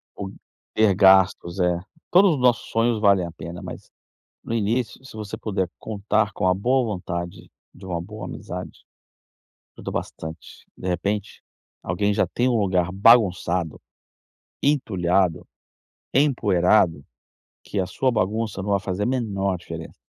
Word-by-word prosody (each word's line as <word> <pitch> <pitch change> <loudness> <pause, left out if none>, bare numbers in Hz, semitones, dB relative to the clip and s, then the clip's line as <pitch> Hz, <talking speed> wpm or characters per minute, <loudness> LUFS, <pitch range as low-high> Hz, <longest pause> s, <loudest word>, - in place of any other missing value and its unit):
O 95 -1 -6 0.4
ter 110 -4 +3
gastos, 95 -2 +4
é. 90 -1 +2 0.3
Todos 185 +1 +6
os - - -4
nossos 125 -2 +2
sonhos 115 0 +1
valem 100 -4 +4
a 85 - -7
pena, 85 +2 -8
mas, - - -9 0.5
no 115 - -4
início, 115 +3 -1
se 135 - -12
você 105 -1 -5
puder 95 -4 -2
contar 105 0 0
com 95 - 0
a 90 - +4
boa 125 +6 +1
vontade 85 0 -6 0.2
de 95 - -13
uma 85 -2 -3
boa 105 +4 -8
amizade, 90 +1 -8 0.9
ajuda - - -6
bastante. 80 0 -7
De 95 - -6
repente, 100 +3 -2 0.4
alguém 100 +4 0
já - - +2
tem 125 +1 0
um 120 - +2
lugar 90 -3 +1
bagunçado, 95 -6 +3 0.8
entulhado, 95 - +1 0.7
empoeirado, 100 - +3 0.6
que 100 - -5
a 90 - -1
sua 130 +7 0
bagunça 110 -2 -1
não 100 - -3
vai 100 -1 +2
fazer 95 +1 -3
a - - +1
menor 100 -7 -1
diferença, - - -9
100 Hz, 145 wpm, -23 LUFS, 90-110 Hz, 0.9 s, Todos